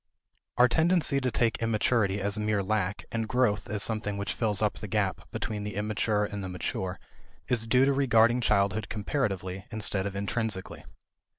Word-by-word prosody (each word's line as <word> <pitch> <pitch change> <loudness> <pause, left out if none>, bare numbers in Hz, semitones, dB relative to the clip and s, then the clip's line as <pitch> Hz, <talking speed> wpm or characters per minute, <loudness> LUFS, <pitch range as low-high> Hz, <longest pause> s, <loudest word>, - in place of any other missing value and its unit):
Our 125 +1 +7
tendency 160 -1 +2
to 130 - +1
take 115 -2 0
immaturity 110 -2 +1
as 100 +1 +1
mere 105 -1 0
lack, 105 -1 -1
and 115 -1 -2
growth 105 -7 +1
as 105 +1 0
something 110 -3 -1
which 100 +1 -2
fills 105 -4 0
up 105 -1 +1
the 105 - -6
gap 100 -2 -1
between 105 -1 -4
the 105 -2 -5
immature 105 0 0
and 100 -1 -5
the 95 - -4
mature 90 0 -3 0.5
is 115 -2 0
due 130 +3 +4
to 140 - +3
regarding 120 -3 +4
childhood 100 -1 +1
comparatively, 100 -5 -2
instead 105 -3 0
of 100 - -6
intrinsically. 100 -1 -3
105 Hz, 170 wpm, -28 LUFS, 100-115 Hz, 0.5 s, Our